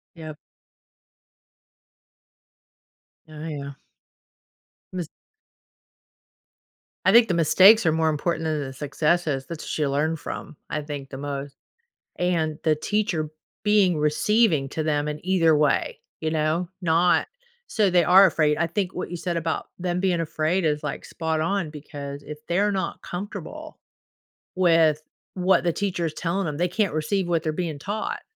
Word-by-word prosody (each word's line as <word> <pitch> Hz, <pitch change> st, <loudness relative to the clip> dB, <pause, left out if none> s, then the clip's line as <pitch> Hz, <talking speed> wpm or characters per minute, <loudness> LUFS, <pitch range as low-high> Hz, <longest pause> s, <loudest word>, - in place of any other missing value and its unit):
Yup. 155 Hz, -2 st, -8 dB, 2.9 s
Oh, 155 Hz, +1 st, -8 dB
yeah. 140 Hz, -2 st, -5 dB, 1.2 s
Mis 175 Hz, -4 st, -4 dB, 2.0 s
I -, -, +6 dB
think 235 Hz, 0 st, +7 dB
the 180 Hz, -, 0 dB
mistakes 190 Hz, +6 st, +6 dB
are 160 Hz, -, +4 dB
more 160 Hz, 0 st, +2 dB
important 160 Hz, +2 st, -1 dB
than 155 Hz, -2 st, -1 dB
the 135 Hz, -1 st, -6 dB
successes, 150 Hz, 0 st, 0 dB
that's 165 Hz, -1 st, -5 dB
ya 150 Hz, -2 st, +1 dB
learn 155 Hz, +4 st, 0 dB
from, 155 Hz, -, -7 dB
I 150 Hz, -, -2 dB
think, 145 Hz, -2 st, -7 dB
the 135 Hz, -, -7 dB
most 140 Hz, 0 st, -5 dB, 0.6 s
and 165 Hz, -4 st, 0 dB
the 155 Hz, -2 st, +3 dB
teacher 175 Hz, -3 st, -1 dB, 0.3 s
being 200 Hz, -5 st, +3 dB
receiving 150 Hz, -, +2 dB
to 160 Hz, -, -3 dB
them 150 Hz, -1 st, 0 dB
in 150 Hz, +1 st, -5 dB
either 165 Hz, -4 st, +4 dB
way, 150 Hz, 0 st, +1 dB, 0.2 s
you 155 Hz, 0 st, -1 dB
know, 160 Hz, +3 st, 0 dB
not 170 Hz, +1 st, +3 dB, 0.4 s
so 210 Hz, -3 st, +2 dB
they 175 Hz, -1 st, +4 dB
are 190 Hz, +2 st, +8 dB
afraid, 155 Hz, -4 st, +2 dB
I 170 Hz, -, +2 dB
think 185 Hz, +2 st, -2 dB
what 180 Hz, -, -4 dB
you 175 Hz, -, -4 dB
said 175 Hz, 0 st, -3 dB
about 165 Hz, -1 st, -2 dB
them 180 Hz, 0 st, -2 dB
being 180 Hz, -3 st, +1 dB
afraid 165 Hz, +3 st, 0 dB
is, 150 Hz, -1 st, 0 dB
like, 150 Hz, -, -4 dB
spot 160 Hz, -1 st, -2 dB
on 185 Hz, -1 st, -1 dB
because 145 Hz, -1 st, -8 dB
if 150 Hz, -, -8 dB
they're 200 Hz, +4 st, +2 dB
not 190 Hz, -1 st, -3 dB
comfortable 195 Hz, +3 st, -7 dB, 0.8 s
with 165 Hz, -4 st, +3 dB, 0.3 s
what 185 Hz, -1 st, +2 dB
the 170 Hz, -, +2 dB
teacher 185 Hz, -4 st, -2 dB
is 155 Hz, -, -3 dB
telling 175 Hz, +2 st, -2 dB
'em, 150 Hz, -, -3 dB
they 175 Hz, +1 st, +1 dB
can't 200 Hz, -3 st, 0 dB
receive 175 Hz, +4 st, -1 dB
what 165 Hz, -1 st, 0 dB
they're 155 Hz, -, 0 dB
being 160 Hz, -3 st, -3 dB
taught. 205 Hz, +8 st, -4 dB
160 Hz, 150 wpm, -24 LUFS, 150-180 Hz, 2.9 s, are